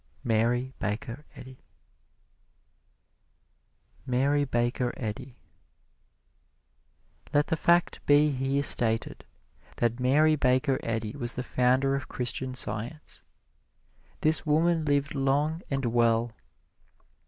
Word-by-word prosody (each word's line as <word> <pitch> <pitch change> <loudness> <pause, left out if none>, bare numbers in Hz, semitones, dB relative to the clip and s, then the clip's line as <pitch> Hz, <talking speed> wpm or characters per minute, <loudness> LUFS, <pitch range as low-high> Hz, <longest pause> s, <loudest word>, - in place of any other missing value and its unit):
Mary 120 +3 0
Baker 115 +8 -4
Eddy 130 0 -12 2.5
MARY 140 +3 +1
BAKER 120 0 -1
EDDY 120 +2 -6 2.0
Let 145 0 +4
the - - -1
fact 170 +2 +1
be 145 +1 +5
here 135 +1 -1
stated 115 -4 +2 0.5
that 120 +1 0
Mary 150 +5 +3
Baker 130 0 +1
Eddy 110 -1 -3
was 120 -4 -4
the 125 - -3
founder 130 +2 +1
of 140 -1 -4
Christian 125 +1 -2
Science. 125 +5 -5 1.0
This 155 0 +4
woman 160 +1 +1
lived 140 -1 0
long 145 +4 0
and 135 -1 -2
well. 115 0 +1
130 Hz, 95 wpm, -27 LUFS, 120-145 Hz, 2.5 s, be